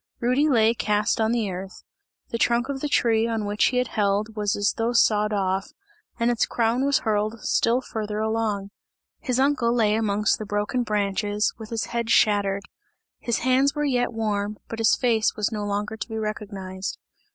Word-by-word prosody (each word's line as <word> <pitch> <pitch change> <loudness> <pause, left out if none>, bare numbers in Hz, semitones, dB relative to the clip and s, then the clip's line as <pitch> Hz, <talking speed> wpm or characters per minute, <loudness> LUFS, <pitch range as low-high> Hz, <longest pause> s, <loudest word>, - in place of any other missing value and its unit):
Rudy 255 +6 +2
lay 225 -4 +4
cast 210 -1 0
on 220 0 +2
the 225 -5 0
earth; 185 +1 -8 0.5
the 230 - -3
trunk 240 +3 +2
of 275 -1 -3
the 295 - -3
tree 230 -3 +2
on 225 -2 -2
which 205 +1 +1
he 250 - +1
had 250 -1 +1
held 210 +1 0
was 210 -1 0
as 205 -1 +1
though 230 +1 -1
sawed 210 -2 +3
off, 195 -1 -1 0.5
and 235 +1 +2
its 235 - +1
crown 235 +2 +1
was 280 -1 +3
hurled 215 +1 0
still 235 +3 +2
farther 215 -4 -4
along. 215 -2 -1 0.5
His 250 -1 -1
uncle 270 -4 +2
lay 220 -3 +2
amongst 210 -1 +1
the 215 - -5
broken 205 +5 -1
branches, 205 -1 0
with 220 -1 -8
his 230 -1 -2
head 235 -1 -1
shattered; 200 -3 +3 0.6
his 235 -1 -1
hands 265 +3 +3
were 295 0 0
yet 245 -4 +1
warm, 210 -2 -2
but 225 - -5
his 225 - +4
face 230 -4 +1
was 210 +1 -1
no 210 -2 -3
longer 205 +1 -2
to 220 - -6
be 220 - -4
recognized. 200 -3 -5
220 Hz, 185 wpm, -24 LUFS, 205-235 Hz, 0.6 s, lay